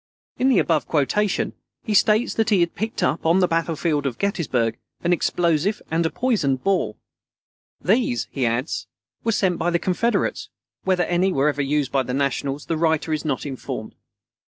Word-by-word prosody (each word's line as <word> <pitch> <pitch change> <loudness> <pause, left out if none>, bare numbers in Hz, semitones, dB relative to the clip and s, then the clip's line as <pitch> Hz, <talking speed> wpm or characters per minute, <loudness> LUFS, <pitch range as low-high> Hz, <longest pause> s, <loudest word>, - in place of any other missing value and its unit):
In 260 - +3
the 260 - +4
above 160 -3 +2
quotation, 185 +7 +1 0.3
he 220 - -2
states 215 +4 +3
that 225 -1 +1
he 200 -5 +4
had 170 0 +1
picked 220 +2 -3
up, 155 - 0
on 165 +3 +4
the 180 - +4
battlefield 165 -3 0
of 120 -4 -4
Gettysburg, 140 - 0 0.2
an 175 0 +3
explosive 175 +3 +1
and 165 +1 +2
a 160 - +1
poisoned 160 - 0
ball. 190 - 0 0.8
"These," 195 - +1
he 135 - -2
adds, 120 +6 -2 0.4
"_were 225 - +1
sent 190 -5 +1
by 175 - +1
the 170 - +2
Confederates. 230 - 0 0.4
Whether 185 -2 +2
any 175 +3 +1
were 145 -3 +2
ever 145 -1 -1
used 140 -1 0
by 135 - +2
the 125 0 -3
Nationals, 140 +1 -1
the 165 - -1
writer 160 -1 +1
is 155 - -2
not 140 -2 -1
informed. 135 -4 -6
165 Hz, 180 wpm, -23 LUFS, 140-195 Hz, 0.8 s, the